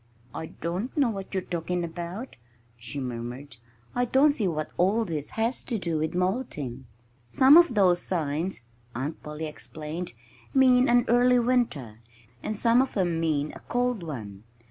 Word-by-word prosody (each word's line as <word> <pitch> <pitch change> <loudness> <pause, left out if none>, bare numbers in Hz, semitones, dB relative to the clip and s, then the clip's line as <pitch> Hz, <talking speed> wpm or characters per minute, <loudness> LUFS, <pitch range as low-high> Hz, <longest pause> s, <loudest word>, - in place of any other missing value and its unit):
"I 160 - -5
don't 180 - -4
know 270 -5 +3
what 195 -2 -6
you're 190 -2 -1
talking 175 +1 -2
about," 175 +8 -6 0.4
she 120 +4 -6
murmured. 125 +1 -6 0.4
"I 245 0 +1
don't 270 +5 +4
see 225 -9 -1
what 155 -3 -2
all 200 +6 +2
this 155 -6 -4
has 230 +3 +1
to 230 - -1
do 170 -5 -2
with 155 +2 -2
molting." 175 - -2 0.4
"Some 265 - +7
of 340 -8 +6
those 180 -4 +4
signs," 165 0 -2 0.3
Aunt 135 +6 -4
Polly 150 +1 -6
explained, 155 +2 -6 0.4
"mean 255 -1 +5
an 240 0 +4
early 245 +1 +5
winter; 230 - 0 0.4
and 215 - -3
some 235 +3 +4
of 265 -4 -2
'em 175 -4 +1
mean 155 -2 0
a - - -9
cold 245 -3 -1
one. 110 -12 -7
180 Hz, 160 wpm, -27 LUFS, 150-240 Hz, 0.4 s, Some